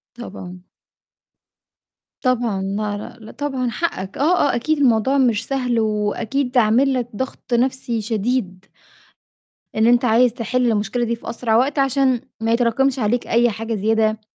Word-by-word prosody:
طبعًا. 185 Hz, -6 st, -9 dB, 1.6 s
طبعًا 240 Hz, -6 st, 0 dB
لا، 205 Hz, +2 st, -4 dB
لأ، 220 Hz, -, -11 dB
طبعًا 265 Hz, -4 st, -2 dB
حقَّك 200 Hz, -, -4 dB
آه، 300 Hz, 0 st, +3 dB
آه -, -, -1 dB
أكيد 305 Hz, +6 st, 0 dB
الموضوع 260 Hz, +1 st, +3 dB
مش 230 Hz, -4 st, +2 dB
سهل، 250 Hz, -4 st, 0 dB
وأكيد 220 Hz, +5 st, -1 dB
عامل 245 Hz, +5 st, +3 dB
لك 245 Hz, -2 st, -2 dB
ضغط 260 Hz, 0 st, -4 dB
نفْسي 245 Hz, -1 st, 0 dB
شديد. 210 Hz, -3 st, -2 dB, 1.1 s
إن 220 Hz, -, +3 dB
أنت 245 Hz, +1 st, +4 dB
عايز 240 Hz, +1 st, +4 dB
تحل 250 Hz, 0 st, 0 dB
المشكلة 215 Hz, +3 st, -1 dB
دي 235 Hz, 0 st, -2 dB
في -, -, -8 dB
أسرع 225 Hz, -2 st, 0 dB
وقت 275 Hz, +4 st, +1 dB
عشان 270 Hz, -2 st, +2 dB, 0.2 s
ما 225 Hz, 0 st, 0 dB
يتراكمش 245 Hz, +3 st, +1 dB
عليك 235 Hz, +2 st, 0 dB
أي 235 Hz, +1 st, +3 dB
حاجة 225 Hz, +1 st, -4 dB
زيادة، 220 Hz, +1 st, +1 dB
235 Hz, 140 wpm, -20 LUFS, 220-255 Hz, 1.6 s, أنت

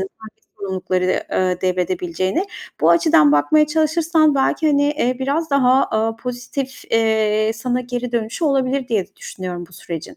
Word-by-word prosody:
hangi 215 Hz, +3 st, -10 dB, 0.2 s
sorumlulukları, 185 Hz, -2 st, -1 dB
ııı, 185 Hz, -1 st, 0 dB
devredebileceğine. 185 Hz, -, -1 dB, 0.4 s
Bu -, -, +4 dB
açıdan 315 Hz, -, +5 dB
bakmaya 300 Hz, -, +3 dB
çalışırsan 315 Hz, 0 st, +2 dB
belki, 275 Hz, +4 st, +1 dB
hani, 285 Hz, 0 st, +2 dB
eee, 255 Hz, -4 st, -1 dB
biraz 290 Hz, +5 st, -1 dB
daha, 265 Hz, -1 st, +4 dB
aaa, 225 Hz, +1 st, -1 dB
pozitif, 250 Hz, +3 st, -6 dB
eee, 220 Hz, -1 st, +2 dB
sana 245 Hz, +2 st, -2 dB
geri 245 Hz, 0 st, -5 dB
dönüşü 230 Hz, +7 st, -2 dB
olabilir 270 Hz, -2 st, +1 dB
de -, -, -25 dB
diye 210 Hz, -6 st, 0 dB
düşünüyorum 180 Hz, -2 st, -7 dB
bu -, -, -23 dB
sürecin. 165 Hz, -1 st, -8 dB
240 Hz, 150 wpm, -19 LUFS, 185-280 Hz, 0.4 s, açıdan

